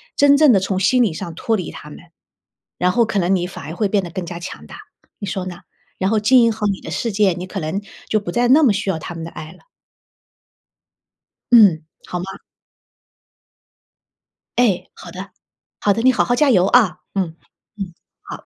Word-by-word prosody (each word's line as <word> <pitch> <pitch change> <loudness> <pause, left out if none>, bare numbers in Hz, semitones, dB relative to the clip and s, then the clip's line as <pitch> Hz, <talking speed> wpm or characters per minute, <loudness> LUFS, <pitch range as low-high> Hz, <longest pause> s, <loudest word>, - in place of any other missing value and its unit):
真 285 0 +5
正 305 -3 +6
地 195 - +4
从 190 0 -2
心 245 +7 +3
理 215 -8 +2
上 165 +1 -6
脱 225 +4 0
离 185 -5 -4
他 150 - -11
们， - - -11 0.8
然 180 +1 +2
后 235 +5 +3
可 215 - -3
能 185 +2 +2
你 175 -1 -1
反 180 - -9
而 160 +3 -7
会 210 +1 0
变 200 -1 0
得 175 - -6
更 185 +1 -5
加 170 0 -7
强 175 - -9
大， - - -11 0.4
你 200 - -5
说 190 -2 -3
呢？ 175 -1 -7 0.4
然 190 +1 0
后 220 -1 +2
经 250 +4 +5
营 230 - +3
好 215 -1 -3
你 195 -2 -1
的 - - -8
世 230 - -2
界， 200 -2 +2
你 180 +1 -6
可 195 - -5
能， 160 +5 -3 0.3
就 215 - +2
不 175 - -6
再 240 +5 +1
那 305 +4 +6
么 230 -8 +5
需 195 - -2
要 170 - 0
他 175 - -7
们 165 - -6
的 165 - -6
爱 155 -1 -9
了。 - - -18 1.9
嗯， 200 -10 +6 0.2
好 180 - -4
吗？ 180 - -5 2.3
哎， 220 -7 +2
好 175 - -12
的。 190 +2 -8 0.5
好 205 - +2
的， 225 - -2
你 260 - +6
好 - - +1
好 245 - +1
加 290 +1 +3
油 185 -7 +4
啊， 200 -6 +3 0.2
嗯， 175 -5 -2 0.4
嗯， 190 -4 -6 0.3
好。 - - -10
195 Hz, 225 characters per minute, -19 LUFS, 175-225 Hz, 2.3 s, 正